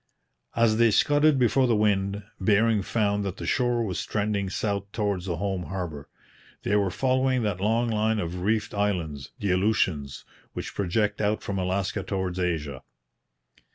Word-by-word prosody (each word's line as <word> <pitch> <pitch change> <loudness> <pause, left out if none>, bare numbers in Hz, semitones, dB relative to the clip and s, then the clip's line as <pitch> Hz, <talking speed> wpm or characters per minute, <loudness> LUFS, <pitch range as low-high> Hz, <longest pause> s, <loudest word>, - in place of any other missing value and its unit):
As 115 -2 +3
they 115 0 +5
scudded 145 +6 +4
before 130 +1 +3
the 120 - +3
wind, 100 -1 +1 0.2
Bering 105 +2 +3
found 105 0 0
that 100 -2 -4
the - - -6
shore 120 -2 +1
was 95 -5 -3
trending 105 -2 -1
south 100 0 -2
towards 100 -4 -2
the 85 -2 -2
home 95 -1 -2
harbour. 85 -7 -5 0.5
They 105 - +1
were 100 -2 +2
following 130 +4 +1
that 100 -4 -2
long 115 +4 +2
line 110 +1 +1
of 90 -2 -3
reefed 105 +2 0
islands, 85 -9 -2
the 100 -4 0
Aleutians, 90 -8 0 0.3
which - - -6
project 105 +3 0
out 105 +1 0
from 100 -1 -3
Alaska 95 +2 -1
towards 95 -1 -3
Asia. 75 -7 -2
100 Hz, 155 wpm, -26 LUFS, 95-110 Hz, 0.5 s, they